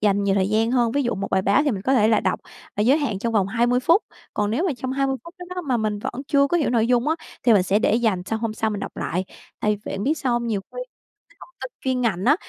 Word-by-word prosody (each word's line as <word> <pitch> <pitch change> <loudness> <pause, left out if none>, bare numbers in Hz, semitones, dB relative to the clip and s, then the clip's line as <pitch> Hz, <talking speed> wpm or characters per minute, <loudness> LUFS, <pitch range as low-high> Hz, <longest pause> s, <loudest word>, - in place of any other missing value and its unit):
dành 200 -1 +2
nhiều 195 -1 +2
thời 190 0 +1
gian 220 +2 +2
hơn. 240 -2 +2
Ví 285 - +1
dụ 240 - -1
một 195 0 -4
bài 190 0 +2
báo 200 +9 +3
thì 290 - +1
mình 195 -4 -3
có 265 +4 +2
thể 215 -3 +4
là 220 - +3
đọc - - -1 0.4
và - - -1
giới 265 +8 +4
hạn 225 -10 -2
trong 230 +2 -2
vòng 200 -3 +2
20 240 +4 +1
phút. 335 - +4 0.3
Còn 205 0 0
nếu 275 - 0
mà 320 - +1
trong 260 0 -4
20 270 0 0
phút 340 +2 -12
đó 355 - -8
đó 360 - -3
mà 260 -5 0
mình 215 -2 -1
vẫn 245 +5 -5
chưa 280 -1 +4
có 345 - +1
hiểu 300 -7 +1
nội 230 -2 +2
dung 250 +3 +2
á 320 - +2 0.3
thì 240 - +5
mình 195 -3 +5
sẽ 195 +3 +2
để 220 - +2
dành 220 -6 +1
sang 225 +2 -2
hôm 225 -1 -2
sau 220 0 -1
mình 205 -1 -4
đọc - - -7
lại. 180 +3 -2 0.4
Tại 210 - +1 0.2
biết - - -3
bạn 300 +4 +2
sao 260 -5 -1
hông? 240 0 0
Nhiều 210 -4 -1
khi 195 - -18
cái - - -87 0.4
thông 350 - -15
tin 260 - -5
chuyên 260 -1 0
ngành 200 -5 0
á, 290 +5 +6
235 Hz, 310 wpm, -23 LUFS, 210-265 Hz, 0.4 s, á